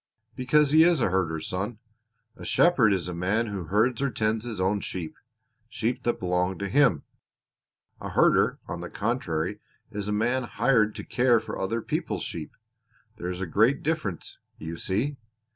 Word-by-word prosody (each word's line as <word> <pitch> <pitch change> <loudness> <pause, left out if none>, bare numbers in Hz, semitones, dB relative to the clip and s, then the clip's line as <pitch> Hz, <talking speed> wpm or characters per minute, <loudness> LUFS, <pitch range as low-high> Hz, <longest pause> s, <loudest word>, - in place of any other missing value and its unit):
"Because 140 +3 +3
he 155 +1 +7
is 170 -2 +4
a 105 - +1
herder, 85 -4 0
son. 100 +8 -4 0.6
A - - -11
shepherd 135 -11 +4
is 90 -3 0
a 90 - -4
man 95 +7 0
who 100 -5 -5
herds 110 - +1
or 140 - +1
tends 110 -1 -1
his 115 -5 -5
own 95 +2 +1
sheep 85 -4 -5 0.5
sheep 120 +3 -2
that 120 -1 -1
belong 90 +1 0
to 100 -1 -4
him; 120 - +3 1.0
a - - -6
herder, - - +3
on 85 - -5
the 90 - -6
contrary, 105 -5 -2 0.3
is 105 -1 -4
a - - -1
man 120 +5 +1
hired 115 -2 +2
to - - -6
care 120 -2 +3
for - - -6
other 110 +4 -2
people's - - -2
sheep. - - -5 0.7
There 90 - -4
is 90 +1 -5
a - - -1
great 110 - +2
difference, 150 - -3 0.2
you 80 +1 -6
see. 115 +12 -1
105 Hz, 175 wpm, -26 LUFS, 95-125 Hz, 1.0 s, he